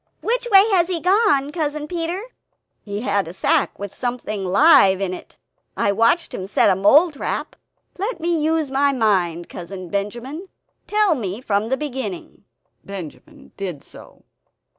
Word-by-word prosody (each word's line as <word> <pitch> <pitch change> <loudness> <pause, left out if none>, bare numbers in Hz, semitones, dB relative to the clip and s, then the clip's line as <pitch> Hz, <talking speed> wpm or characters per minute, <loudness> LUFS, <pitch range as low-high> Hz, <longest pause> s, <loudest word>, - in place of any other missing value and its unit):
which 485 +2 -1
way 395 +1 +7
has 350 -3 +3
he 360 -2 -1
gone, 365 -7 +2
Cousin 300 -2 -3
Peter?" 345 +3 -3 0.6
"He 205 0 -5
had 200 -6 0
a 165 - -8
sack - - 0
with 200 -1 -7
something 240 -5 -4
live 195 - +5
in 190 -2 -2
it; - - -11 0.4
I 200 - +2
watched 230 - +2
him 190 - -5
set 195 - +3
a - - +2
mole 285 - +5
trap. 285 - -4 0.4
Let 415 +1 -3
me 335 -2 0
use 315 -3 0
my 280 +1 +2
mind, 185 -8 0
Cousin 180 0 -8
Benjamin; 240 - -4 0.4
tell 420 -4 +3
me 210 -7 -4
from 215 -2 -1
the 265 - 0
beginning," 300 +4 -6 0.4
Benjamin 200 - -10
did 180 -8 -5
so. - - -14
265 Hz, 155 wpm, -21 LUFS, 200-330 Hz, 0.6 s, way